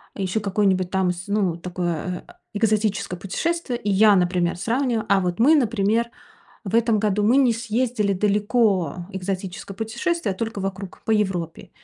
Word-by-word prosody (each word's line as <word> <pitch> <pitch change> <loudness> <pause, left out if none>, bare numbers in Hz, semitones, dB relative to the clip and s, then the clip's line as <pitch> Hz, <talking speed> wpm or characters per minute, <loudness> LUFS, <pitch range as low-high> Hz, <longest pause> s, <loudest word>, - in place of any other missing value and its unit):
ещё 195 +1 -1
какое-нибудь 195 -2 +1
там, 190 -2 +1
с 180 +2 -8
ну, 200 -5 0
такое 175 0 -4
э 355 - -15 0.2
экзотическое 205 -3 0
путешествие. 255 - -2
И 210 - -2
я, 205 +1 +6
например, 175 -1 +1
сравниваю: 235 +3 0
а 200 0 +5
вот 180 +1 -2
мы, 295 +7 +6
например, 230 -2 +1 0.5
в 200 +2 -5
этом 230 -1 +3
году, 210 -1 +1
мы 240 +5 +4
не 260 -4 +4
съездили 230 -2 -1
далеко, 200 - +1
экзотическое 190 0 -5
путешествие, 230 - -2
а - - -18
только 225 -2 -4
вокруг 195 -1 -6
по - - -3
Европе. 185 -6 -1
200 Hz, 155 wpm, -23 LUFS, 185-225 Hz, 0.5 s, я